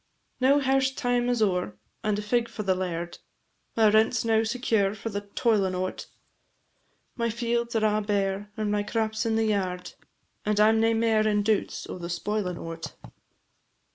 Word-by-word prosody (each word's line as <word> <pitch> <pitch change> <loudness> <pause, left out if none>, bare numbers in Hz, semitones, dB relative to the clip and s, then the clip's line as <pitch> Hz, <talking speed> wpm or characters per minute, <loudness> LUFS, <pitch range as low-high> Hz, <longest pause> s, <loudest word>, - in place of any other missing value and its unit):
Now 265 +2 +5
hairst 270 -1 +1
time 245 0 +1
is 240 -3 +2
o'er, 180 - -1 0.3
and 210 -1 +1
a 210 - -3
fig 235 +2 0
for 215 -2 -5
the 190 -1 +2
laird, 175 -2 -4 0.6
My 220 -1 +6
rent 220 +3 +4
's 220 - -1
now 220 -1 +3
secure 220 -4 0
for 215 +2 -5
the 205 -1 -3
toilin' 205 -2 +1
o't; 185 +1 -4 1.1
My 235 -2 0
fields 235 +1 -1
are 220 -1 +2
a' 215 0 +2
bare, 205 0 -1
and 215 -1 -1
my 210 0 +1
crap 220 +1 -1
's 225 +1 -1
in 225 - +1
the 225 0 +2
yard, 185 -4 -2 0.5
And 210 0 0
I 210 +1 +6
'm 220 0 +3
nae 225 0 +3
mair 225 -1 +2
in 205 -1 +2
doubts 210 -1 0
o' - - -7
the 170 0 -6
spoilin' 180 0 -2
o't. 165 -1 -7
215 Hz, 185 wpm, -27 LUFS, 195-230 Hz, 1.1 s, My